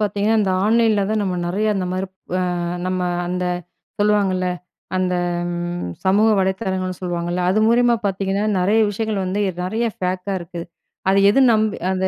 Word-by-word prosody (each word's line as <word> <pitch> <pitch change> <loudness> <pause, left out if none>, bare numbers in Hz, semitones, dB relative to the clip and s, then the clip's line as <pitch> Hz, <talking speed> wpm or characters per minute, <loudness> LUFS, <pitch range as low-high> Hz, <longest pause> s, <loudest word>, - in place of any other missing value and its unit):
பார்த்தீங்கன்னா, 210 +1 +1
அந்த 195 - +1
ஆன்லைன்ல 220 -2 +3
தான் 220 - +1
அ - - 0
நம்ம 185 -2 -1
நிறைய 200 +5 0
அந்த 190 -2 -1
மாதிரி 185 +1 -2 0.3
அ - - +1 0.5
நம்ம 185 0 -1 0.3
அந்த 180 0 -2 0.6
சொல்லுவாங்கள்ல. 200 -3 +2 0.5
அந்த 185 -1 0 0.4
ம் 175 - -3 0.2
சமூக 205 +4 +4
வலைத்தளங்கள்னு 190 -1 -1
சொல்லுவாங்கள்ல. 175 0 -2
அது 210 +3 +2
மூலியமா 240 0 +4
பார்த்தீங்கன்னா, 195 +1 -1 0.2
நிறைய 205 +5 +3
விஷயங்கள 215 0 -2
வந்து 195 +3 -1 0.2
நிறைய 220 +6 -1 0.2
பேக்கா 185 +2 -2
இருக்கு. 170 0 -7 0.5
அது 195 +1 +4
எது 255 - +3
நம்பி 215 -1 +1
அது 190 0 0
195 Hz, 155 wpm, -20 LUFS, 185-210 Hz, 0.6 s, சமூக